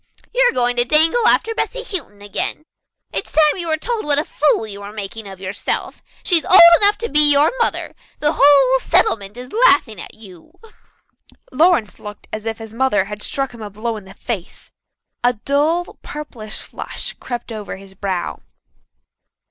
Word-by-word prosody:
"You - - +3
are - - -5
going 245 -1 +1
to 240 - +5
dangle 325 - +4
after 450 - +2
Bessy - - -3
Houghton 260 - -5
again. 205 +8 -2 0.5
It's - - -4
time 305 +1 +3
you 340 - -4
were 315 -1 0
told 460 +6 -3
what 290 -1 +2
a 295 - +2
fool 295 -8 0
you 200 -2 -8
were 200 0 -8
making 210 +1 -7
of 190 -1 -10
yourself. 190 +1 -4 0.2
She's 340 -4 +2
old 375 - +6 0.2
enough 410 +1 +4
to 465 - -4
be 300 -6 +6
your 285 +2 +4
mother. 465 - -1 0.2
The 300 +1 0
whole 275 -2 +5
settlement 205 -3 +1
is 250 +1 -10
laughing 285 - +3
at - - -10
you." 195 - -14 1.0
Lawrence 305 - +2
looked 210 0 -11
as 215 +1 -5
if 225 0 -3
his 225 -1 -10
mother 230 -6 +1
had 210 +1 -8
struck 270 +2 -2
him 235 - -12
a 210 - -6
blow 220 +3 -4
in 210 -3 -10
the 190 +1 -14
face. 205 -7 -7 0.5
A 245 +1 +3
dull, 295 +9 -1
purplish 240 -8 -8
flush - - -7
crept 240 -1 -6
over 210 -3 -7
his 195 0 -14
brow. 190 -2 -4
245 Hz, 180 wpm, -18 LUFS, 210-305 Hz, 1.0 s, old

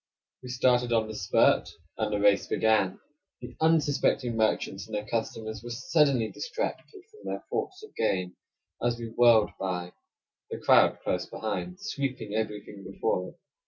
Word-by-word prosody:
We 125 - -9
started 125 -1 +2
on 110 -2 +2
the 110 - -6
spurt; 95 -2 +3 0.3
and 110 -1 -2
the 105 - 0
race 100 -1 +4
began. 110 -4 +2 0.4
The 125 0 -10
unsuspecting 145 -6 +2
merchants 110 -3 0
and 110 - -5
their 105 0 -3
customers 110 0 -3
were 120 - -7
suddenly 135 -1 +2
distracted 470 -4 -5
from 430 - -18
their - - -4
thoughts 400 -2 -3
of 435 - -13
gain 90 -1 0 0.5
as 120 0 +1
we 115 -1 -6
whirled 115 -2 +5
by; 90 -2 -3 0.6
the - - -4
crowd - - +5
close - - -1
behind 90 -5 -4
sweeping 130 -7 -3
everything 105 -2 -4
before 95 -1 -2
it. - - -18
110 Hz, 155 wpm, -28 LUFS, 105-125 Hz, 0.6 s, whirled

